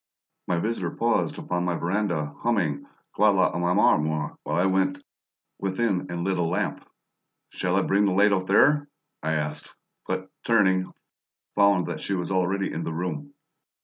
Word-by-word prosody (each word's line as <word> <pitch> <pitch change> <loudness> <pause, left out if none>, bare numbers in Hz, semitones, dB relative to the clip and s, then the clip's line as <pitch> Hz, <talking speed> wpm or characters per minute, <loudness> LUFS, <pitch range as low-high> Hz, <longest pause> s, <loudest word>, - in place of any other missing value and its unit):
My 90 - +1
visitor 115 +6 -1
paused 115 +1 0
upon 90 0 -2
my 90 -1 0
veranda, 85 -5 -1
humming, 100 -12 0 0.3
"Quand - - +4
l'Amour 90 -1 +3
Meurt" 75 -1 -2
while - - -1
I 90 - +3
went 95 0 +1 0.6
within 95 -1 -1
and 85 0 -3
lit 95 -1 0
a - - +2
lamp. 85 +1 -2 0.6
"Shall 90 0 -1
I 100 - +3
bring 100 +1 +2
the 100 - +2
light 100 +2 +4
out 95 -1 -1
there?" 145 +8 +4 0.3
I 80 +1 -1
asked, 75 0 -4 0.3
but, 95 0 -3
turning, 95 -5 +2 0.6
found 100 -3 +4
that - - -5
she 100 - -2
was 90 +1 -3
already 95 +1 0
in 80 - -3
the 80 - -3
room. 90 - -4
95 Hz, 160 wpm, -25 LUFS, 85-100 Hz, 0.6 s, Quand